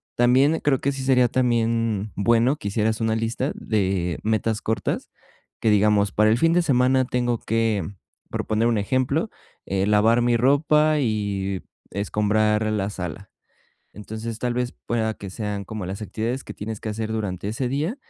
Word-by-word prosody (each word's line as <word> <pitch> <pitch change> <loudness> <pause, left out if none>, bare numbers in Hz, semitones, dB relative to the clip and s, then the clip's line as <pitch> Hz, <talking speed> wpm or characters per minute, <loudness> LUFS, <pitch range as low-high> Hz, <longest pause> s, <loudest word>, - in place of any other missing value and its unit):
También 130 +6 +4
creo 135 -3 +1
que 140 - +1
sí 135 -1 -5
sería 125 -2 +4
también 115 -4 0
bueno, 115 +7 +3
que 125 - -6
hicieras 110 +1 0
una 110 0 +1
lista 115 +5 -1
de 95 -5 -1
metas 110 0 0
cortas 110 - -2 0.5
que 110 - +2
digamos, 105 -1 +3
para 105 +3 +3
el 115 - +3
fin 165 +3 +3
de 175 - +4
semana 130 -2 +3
tengo 120 -2 -1
que 115 -3 0 0.5
por - - -3
poner 110 +2 +2
un 115 -2 +2
ejemplo, 130 - 0 0.4
eh, 95 0 0
lavar 110 +3 +4
mi 120 0 +2
ropa 150 +4 +3
y 100 -6 -1 0.3
escombrar 105 +2 +1
la 100 -2 -1
sala. 90 0 -6 0.6
Entonces, 110 +2 -6
tal 120 -1 -1
vez 125 0 -1
pueda 110 -2 0
que 100 -2 -8
sean 105 0 -4
como 105 -1 -6
las 100 +3 -5
actividades 115 +5 -3
que - - -8
tienes 110 +1 -6
que 110 - -4
hacer 110 +1 -3
durante 100 -4 -3
ese 120 +4 -2
día, 150 - -1
110 Hz, 170 wpm, -23 LUFS, 105-125 Hz, 0.6 s, También